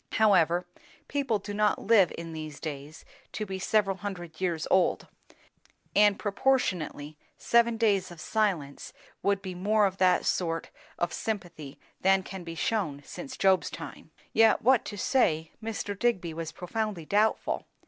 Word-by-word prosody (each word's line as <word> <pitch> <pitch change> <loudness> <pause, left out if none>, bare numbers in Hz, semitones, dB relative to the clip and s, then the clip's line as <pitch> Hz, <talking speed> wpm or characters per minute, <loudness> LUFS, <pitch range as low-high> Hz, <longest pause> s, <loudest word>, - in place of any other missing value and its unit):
However, 180 -5 +4 0.4
people 275 -6 0
do 205 0 -7
not 210 0 +2
live 205 -5 +4
in 165 -1 -7
these 155 -2 -7
days 150 0 -7 0.3
to 215 - -3
be 190 -1 -5
several 195 0 +1
hundred 175 -5 -7
years 170 -4 -1
old; 185 -1 +3 0.9
and 205 -1 +5
proportionately, 185 - -1 0.2
seven 235 -1 +3
days 200 -5 +2
of 175 -2 -11
silence 175 -10 -1 0.3
would 200 -1 +1
be 185 -2 -5
more 205 +4 +2
of 190 -1 -1
that 185 -1 +3
sort 165 -2 -1 0.3
of 175 0 -1
sympathy 175 -10 -5 0.2
than 190 0 +4
can 190 -1 -8
be 165 -1 -7
shewn 165 -7 -1
since 275 -1 -8
Job's 190 -1 +3
time. - - -9 0.2
Yet 225 0 +4
what 255 0 +4
to 205 - -6
say, 160 - +1
Mr. 220 -2 -3
Digby 185 -9 0
was 160 0 -5
profoundly 190 0 -4
doubtful. 210 +5 +1
190 Hz, 150 wpm, -28 LUFS, 165-215 Hz, 0.9 s, and